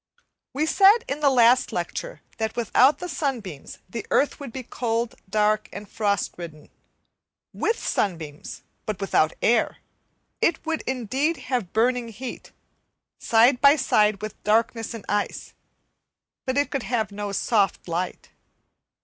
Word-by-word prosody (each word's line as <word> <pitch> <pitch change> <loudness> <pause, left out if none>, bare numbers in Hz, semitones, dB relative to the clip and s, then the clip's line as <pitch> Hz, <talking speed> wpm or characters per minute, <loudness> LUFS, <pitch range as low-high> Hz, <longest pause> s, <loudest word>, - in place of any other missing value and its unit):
We 290 +4 0
said 405 +7 +5
in 300 - -3
the 295 -2 +4
last 250 0 +4
lecture - - -4 0.2
that 220 0 -2
without 250 +4 +4
the 360 - -6
sunbeams 230 - -4
the 230 +4 -5
earth 285 - +2
would 280 -4 -7
be 260 +2 -6
cold, 235 -1 -2 0.2
dark, 215 +1 +1
and 205 +1 -8
frost 200 -1 -1
ridden. 155 -3 -9 0.8
With 445 +1 0
sunbeams, 160 -7 -3 0.2
but 215 -3 -3
without 165 -5 +2
air, 240 - +2 0.6
it 330 - +1
would 320 0 -1
indeed 265 +6 -1 0.2
have 230 -8 -1
burning 245 +2 +1
heat, 235 +3 -8 0.7
side 240 +3 +4
by 280 +1 +7
side 215 -7 +2
with 215 - -7
darkness 225 +2 +1
and 220 - -9
ice, 205 0 -2 0.9
but 260 +1 0
it 285 - +1
could 275 - -1
have 225 -3 -1
no 205 0 -4
soft 200 -1 +1
light. 175 +2 -3
230 Hz, 140 wpm, -24 LUFS, 205-265 Hz, 0.9 s, by